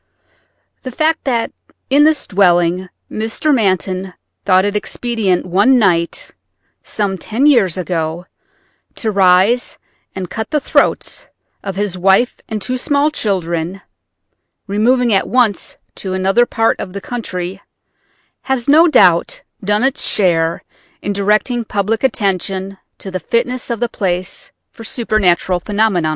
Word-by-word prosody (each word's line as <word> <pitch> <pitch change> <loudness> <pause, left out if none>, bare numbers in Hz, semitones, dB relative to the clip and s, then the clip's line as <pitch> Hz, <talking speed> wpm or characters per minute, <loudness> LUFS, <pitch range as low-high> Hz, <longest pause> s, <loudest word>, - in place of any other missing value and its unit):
The 255 - -6
fact 310 +5 0
that 240 -4 0 0.4
in 290 +2 +5
this 310 -2 +2
dwelling 180 -1 +2 0.2
Mr. 225 +8 -1
Manton 190 - -1 0.3
thought 185 -1 +4
it 205 0 -2
expedient 210 -3 -1
one 200 +9 +3
night 175 -7 0 0.5
some 195 -3 -3
ten 225 - -1
years 230 - +4
ago 170 -1 -3 0.7
to 220 - -2
rise 195 +5 +3 0.4
and 190 -1 -4
cut 220 +4 -5
the 300 - +1
throats - - 0 0.4
of 195 -2 -5
his 195 -2 -2
wife 195 +7 +3
and 220 -1 -3
two 255 +5 -3
small 290 +2 +1
children, 180 - -2 0.8
removing 235 +4 +2
at 195 - +1
once 240 -5 0 0.2
to 190 -2 -4
another 195 +6 +2
part 225 0 0
of 185 - -6
the 200 - -6
country, 190 -5 -5 0.8
has 265 -3 -2
no 315 +4 +6
doubt - - +3 0.2
done 210 +3 +1
its 270 0 +1
share 165 -4 +1 0.4
in 205 - -2
directing 210 +5 +1
public 215 +2 -2
attention 195 -4 -1 0.2
to 195 - -8
the 185 - -3
fitness 245 +8 -1
of 235 -2 -2
the 240 - 0
place 185 -5 -3 0.2
for 225 - -12
supernatural 195 -6 +1
phenomena. 200 -4 0
205 Hz, 135 wpm, -16 LUFS, 185-240 Hz, 0.8 s, no